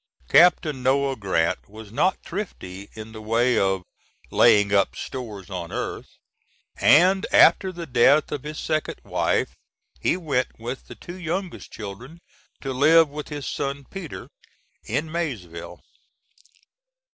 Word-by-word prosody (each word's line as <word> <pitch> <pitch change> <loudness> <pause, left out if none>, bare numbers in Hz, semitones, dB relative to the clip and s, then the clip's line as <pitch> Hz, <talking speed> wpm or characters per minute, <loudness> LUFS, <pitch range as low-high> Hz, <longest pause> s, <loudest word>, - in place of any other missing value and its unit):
Captain 160 -5 +5
Noah 135 +1 +2
Grant 95 -7 -1
was 110 0 -11
not 185 +11 +2
thrifty 100 - -6
in 110 0 -9
the 110 -1 -9
way 115 +3 +2
of 95 -1 +1 0.5
"laying 105 -3 +5
up 100 -1 +2
stores 105 -7 -7
on 85 -3 -5
earth," - - -4 0.7
and, 185 +5 +5
after 190 -1 +6
the 170 -2 -7
death 135 +2 +4
of 145 - -3
his 150 +2 -7
second 155 -1 -2
wife, - - 0 0.4
he - - +1
went, 140 -8 -2
with 120 +4 -6
the - - -10
two 175 +2 -10
youngest 180 +2 -4
children, 115 - -9 0.4
to 135 -1 -3
live 155 +4 +5
with 150 +1 -7
his 145 -2 -6
son 140 0 -3
Peter, 165 - -7 0.6
in 140 +8 -1
Maysville. 110 - -5
130 Hz, 135 wpm, -24 LUFS, 110-160 Hz, 0.7 s, after